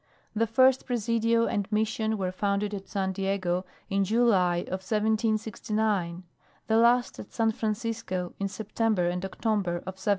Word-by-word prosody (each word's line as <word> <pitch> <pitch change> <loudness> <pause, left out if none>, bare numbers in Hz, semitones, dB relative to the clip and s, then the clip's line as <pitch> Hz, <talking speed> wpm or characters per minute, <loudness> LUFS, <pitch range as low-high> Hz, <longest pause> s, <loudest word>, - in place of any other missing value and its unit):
The 230 +2 +2
first 260 +3 +4
Presidio 230 -1 +1
and 205 -1 -2
Mission 220 0 0
were 185 -2 -1
founded 200 +2 -1
at 195 -1 -6
San 190 -2 -1
Diego 190 -1 -1 0.2
in 195 0 +1
July 195 -5 +3
of 185 +1 -5
1769; 215 -3 0 0.4
the 220 - +2
last 240 +2 +3
at - - -9
San 225 -1 +1
Francisco 215 -5 -3
in 200 - 0
September 215 -2 0
and 180 +1 -2
October 195 -1 -1
of 190 0 -7
1776. - - -9
210 Hz, 145 wpm, -28 LUFS, 190-225 Hz, 0.4 s, first